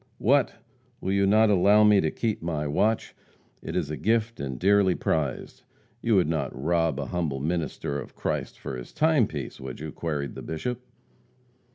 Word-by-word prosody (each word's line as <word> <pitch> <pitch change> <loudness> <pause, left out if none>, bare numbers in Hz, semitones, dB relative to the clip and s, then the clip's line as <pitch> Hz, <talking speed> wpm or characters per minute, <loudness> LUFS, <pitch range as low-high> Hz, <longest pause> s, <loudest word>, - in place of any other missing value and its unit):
"What! - - +2 0.4
Will 95 - -2
you 100 0 +3
not 110 +1 +5
allow 100 +2 +5
me 105 -2 +6
to 80 - +1
keep 110 +5 -2
my 80 -3 -2
watch. 105 +10 0 0.5
It - - -6
is 75 - -1
a - - -2
gift 115 +1 0
and 65 -3 -4
dearly 100 +1 +3
prized. 70 -5 -2 0.4
You 115 -2 +2
would 90 -5 +4
not 70 -6 -2
rob 80 -1 +1
an 70 - -4
humble 80 -6 -2
minister 75 -2 -2
of 65 - -10
Christ - - -3
of 65 - -3
his 60 -1 -8
timepiece, 155 -8 +1
would 65 -1 -7
you?" 75 +1 -6
queried 75 -5 -3
the - - -8
Bishop. 120 +10 -4
85 Hz, 175 wpm, -26 LUFS, 70-105 Hz, 0.5 s, me